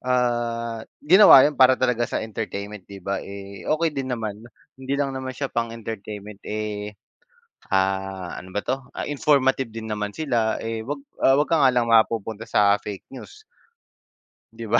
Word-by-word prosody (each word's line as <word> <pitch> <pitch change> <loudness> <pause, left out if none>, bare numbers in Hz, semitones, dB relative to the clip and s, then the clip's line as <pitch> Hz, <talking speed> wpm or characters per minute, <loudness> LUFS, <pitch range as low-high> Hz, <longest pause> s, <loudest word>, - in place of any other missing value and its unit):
ah, 120 -2 -1 0.2
ginawa 175 -4 +9
yun 150 - +2
para 130 -2 +5
talaga 125 -2 0
sa - - -2
entertainment, 105 -2 -6
'di 100 -2 -11
ba? 100 0 -2
Eh, 100 0 -9
okey 160 +1 +1
din 135 -2 -4
naman, 110 -4 -4 0.4
hindi 130 +1 -4
lang 140 -1 -1
naman 130 -1 -5
siya 140 -2 -4
pang-entertainment, 110 -3 -5
eh, 105 -1 -5 0.8
ah, 95 -1 -1
ano 95 +1 -10
ba 105 - -1
'to, 130 +4 -3
ah, - - -5
informative 135 -4 +2
din 110 0 -7
naman 105 -1 -3
sila, 120 -6 -1
eh, 115 -1 -4
'wag 140 +4 -4 0.2
'wag 140 +3 +3
ka 165 - +3
nga 130 - +5
lang 120 -1 +1
mapupunta 115 -1 +2
sa 100 -2 +3
fake 105 -1 -8
news, 420 - -12 1.1
'di 115 - -8
ba? 120 - +5
115 Hz, 160 wpm, -23 LUFS, 105-130 Hz, 1.1 s, ginawa